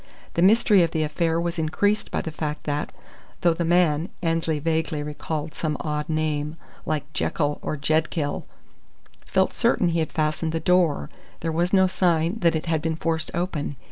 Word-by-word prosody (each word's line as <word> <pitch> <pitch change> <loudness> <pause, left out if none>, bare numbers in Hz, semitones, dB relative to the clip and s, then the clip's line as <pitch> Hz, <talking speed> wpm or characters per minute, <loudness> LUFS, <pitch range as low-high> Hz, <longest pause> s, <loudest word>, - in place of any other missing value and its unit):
The 170 - 0
mystery 205 0 +5
of 170 - +3
the 160 -1 0
affair 165 +2 0
was 170 0 -2
increased 205 +7 +1
by - - -1
the 160 - -5
fact 150 -1 -4
that, 145 0 -2 0.5
though 170 -1 +4
the 170 - -2
man 170 -1 +2
(Annesley 165 -1 +1
vaguely 160 -1 -1
recalled 150 +1 -4
some 155 -2 -2
odd 150 -1 -3
name, 155 0 -1 0.3
like 150 0 -2
Jekyll 145 -2 0
or 155 - -3
Jedkill) 155 +1 0 0.8
felt - - +2
certain 175 - +2
he 165 0 0
had 160 - -1
fastened 155 +1 0
the 165 - 0
door, 170 - +2 0.3
there 165 - -1
was 170 +3 0
no 190 -1 +5
sign 175 0 +1
that 170 -4 +3
it 160 - -2
had 160 -2 0
been 160 0 -1
forced 160 0 -1
open. 170 -5 -2
160 Hz, 175 wpm, -24 LUFS, 150-170 Hz, 0.8 s, mystery